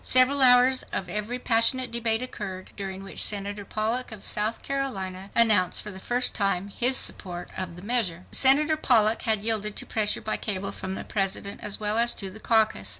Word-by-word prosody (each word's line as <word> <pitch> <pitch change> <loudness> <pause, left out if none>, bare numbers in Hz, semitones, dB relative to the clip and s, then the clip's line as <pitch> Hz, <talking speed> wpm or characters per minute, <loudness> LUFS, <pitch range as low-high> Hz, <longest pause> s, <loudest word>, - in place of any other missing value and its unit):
Several 255 +2 +5
hours 255 0 +6
of 190 - -3
very 210 +6 -4
passionate 250 +2 +1
debate 230 0 0
occurred, 185 -7 -7
during 195 -1 -6
which 195 - -2
Senator 205 0 -1
Pollock 220 +5 -2
of 215 -3 -9
South 215 +2 -2
Carolina 195 -9 -4
announced 210 -6 +3
for 210 - -6
the 190 - -9
first 245 +5 0
time 195 -1 -1
his 250 +6 +3
support 175 -2 -3
of 180 -3 -5
the 180 - -11
measure. 200 -7 0
Senator 295 +4 +5
Pollock 225 -6 +3
had 215 -2 +1
yielded 215 -2 0
to - - -2
pressure 215 -2 0
by 215 - -2
cable 195 -2 -3
from 190 0 -6
the - - -6
President 200 0 -3
as 210 -1 -5
well 215 +1 +1
as 235 0 +2
to 195 -2 -5
the 215 - -11
caucus. 220 -1 +2
215 Hz, 190 wpm, -26 LUFS, 195-245 Hz, -, hours